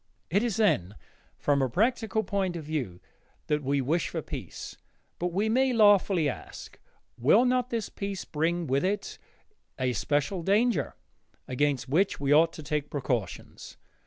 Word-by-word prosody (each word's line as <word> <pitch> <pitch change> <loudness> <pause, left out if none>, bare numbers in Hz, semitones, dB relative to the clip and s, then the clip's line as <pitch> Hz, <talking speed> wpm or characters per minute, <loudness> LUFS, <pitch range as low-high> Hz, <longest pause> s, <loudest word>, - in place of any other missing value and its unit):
It 200 +4 +3
is, 235 -4 -1
then, 145 - +2 0.4
from 140 -1 +1
a 130 - +1
practical 220 - +1
point 195 -2 -1
of 165 - -5
view 140 - -4 0.5
that 150 0 0
we 140 0 0
wish 155 +6 0
for - - -4
peace. - - -7 0.4
But, 175 - 0
we 195 +5 0
may 255 +3 +2
lawfully 205 -7 +4
ask, 135 - -7 0.4
will 200 - +5
not 250 0 +1
this 230 -3 -2
peace 200 -1 -5
bring 170 +3 -1
with 135 0 0
it 200 +2 -2 0.6
a 130 -1 0
special 145 +8 -1
danger, 215 +7 +1 0.5
against 135 0 0
which 175 +9 +1
we 140 0 +2
ought 165 +2 +5
to 155 - -9
take 145 0 -2
precautions? 125 -8 -4
165 Hz, 155 wpm, -28 LUFS, 140-205 Hz, 0.6 s, will